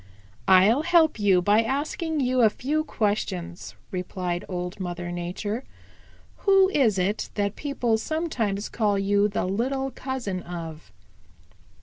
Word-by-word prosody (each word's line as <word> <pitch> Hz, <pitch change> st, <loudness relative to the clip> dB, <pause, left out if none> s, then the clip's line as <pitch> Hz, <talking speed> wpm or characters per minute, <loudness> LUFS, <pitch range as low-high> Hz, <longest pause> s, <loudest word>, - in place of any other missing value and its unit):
"I'll 195 Hz, +8 st, +6 dB
help 325 Hz, -5 st, +3 dB
you 190 Hz, -3 st, +4 dB
by 205 Hz, +4 st, +4 dB
asking 295 Hz, +5 st, -2 dB
you 255 Hz, -1 st, +2 dB
a 220 Hz, -, +6 dB
few 295 Hz, +8 st, -1 dB
questions," 205 Hz, -, -2 dB, 0.2 s
replied 180 Hz, -1 st, -3 dB
Old 180 Hz, +1 st, -4 dB
Mother 175 Hz, -1 st, -4 dB
Nature. 180 Hz, +7 st, -4 dB, 0.7 s
"Who 390 Hz, -1 st, +4 dB
is 245 Hz, -, +2 dB
it 190 Hz, +3 st, -1 dB
that 200 Hz, -1 st, -1 dB
people 245 Hz, -6 st, 0 dB
sometimes 230 Hz, -10 st, -2 dB
call 210 Hz, -3 st, 0 dB
you 200 Hz, +1 st, +2 dB
the 205 Hz, -, -2 dB
little 265 Hz, +8 st, -1 dB
cousin 250 Hz, -10 st, -4 dB
of?" 165 Hz, -8 st, -8 dB
210 Hz, 125 wpm, -25 LUFS, 185-265 Hz, 0.7 s, I'll